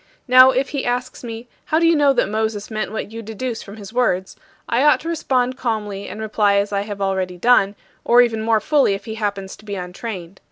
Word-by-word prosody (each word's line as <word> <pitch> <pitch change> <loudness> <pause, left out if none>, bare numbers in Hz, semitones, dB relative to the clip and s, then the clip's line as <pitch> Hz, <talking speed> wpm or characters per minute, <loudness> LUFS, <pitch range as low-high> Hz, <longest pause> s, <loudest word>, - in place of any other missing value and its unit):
Now 255 +1 +8
if 265 +1 0
he 280 -2 -3
asks 250 +1 -3
me, 230 0 -7 0.2
"How 310 - +1
do 335 - +3
you 330 0 +5
know 290 -2 +4
that 250 - +1
Moses 215 0 -2
meant 215 -2 -3
what 220 -1 -5
you 230 +1 -7
deduce 225 +2 -5
from 200 +1 -11
his 205 0 -10
words?", 190 -7 0 0.3
I 235 - +1
ought 295 +1 +5
to 325 - -8
respond 260 -6 0
calmly 210 -4 -3
and - - -7
reply 210 -2 +1
as 200 +1 0
I 200 - +1
have 205 -1 -6
already 190 -2 -1
done, 205 -1 +3 0.3
or 245 +1 +6
even 225 -2 -1
more 220 0 +2
fully 280 -3 +2
if 195 0 -9
he 220 - -5
happens 200 -3 -4
to 215 - -18
be 205 -1 -4
untrained. 185 0 -7
220 Hz, 230 wpm, -20 LUFS, 200-250 Hz, 0.3 s, Now